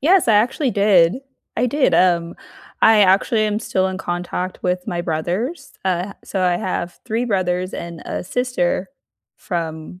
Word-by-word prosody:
Yes, 345 -1 +4
I 215 - +5
actually 250 +5 +2
did. 200 -2 +4 0.4
I 250 - +2
did, 285 +3 +2
um, 170 -2 +2 0.5
I 220 -1 +7
actually 200 +4 +4
am 210 0 0
still 190 -3 0
in 190 - -5
contact 180 0 -4
with 180 0 -1
my 175 - -2
brothers. 185 - -3
Uh, 185 +1 -1
I - - -27
so 195 - -3
I 180 -1 +2
have 175 -1 -4
3 230 +3 -1
brothers 185 -3 -1
and 170 -1 -7
a - - -3
sister 190 -4 -1 0.5
from 165 0 -5
185 Hz, 160 wpm, -20 LUFS, 175-220 Hz, 0.5 s, I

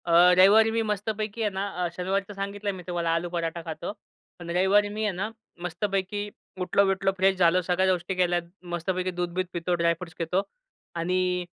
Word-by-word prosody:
अ, 170 - -1 0.3
रविवारी 215 +4 +7
मी 225 0 +1
मस्तपैकी 210 +1 -2
आहे 215 - +2
ना, 195 +1 -1 0.2
अ, - - +1
शनिवारीचं 195 +3 -2
सांगितलं 200 +1 -3
मी 185 -1 -9
तुम्हाला 170 -2 -1
आलू 170 +1 -2
पराठा 170 -1 -3
खातो. 160 +2 -5 0.5
पण 175 -1 -8
रविवारी 190 +4 +3
मी 215 +1 -3
आहे 210 - +1
ना, 200 +4 -2 0.3
मस्तपैकी 190 +3 -2 0.4
उठलो-बिठलो, 195 +1 +2
फ्रेश 190 0 +3
झालो 180 0 +4
सगळ्या 185 +1 +2
गोष्टी 180 +1 -2
केल्यात. 175 -1 +2 0.3
मस्तपैकी 185 +2 -1
दूध-बिध 180 +1 -1
पितो. 175 +1 0
ड्राय 170 0 +4
फ्रूट्स 175 -2 -9
घेतो 175 +3 +1 0.6
आणि 180 +1 0
185 Hz, 170 wpm, -26 LUFS, 175-200 Hz, 0.6 s, रविवारी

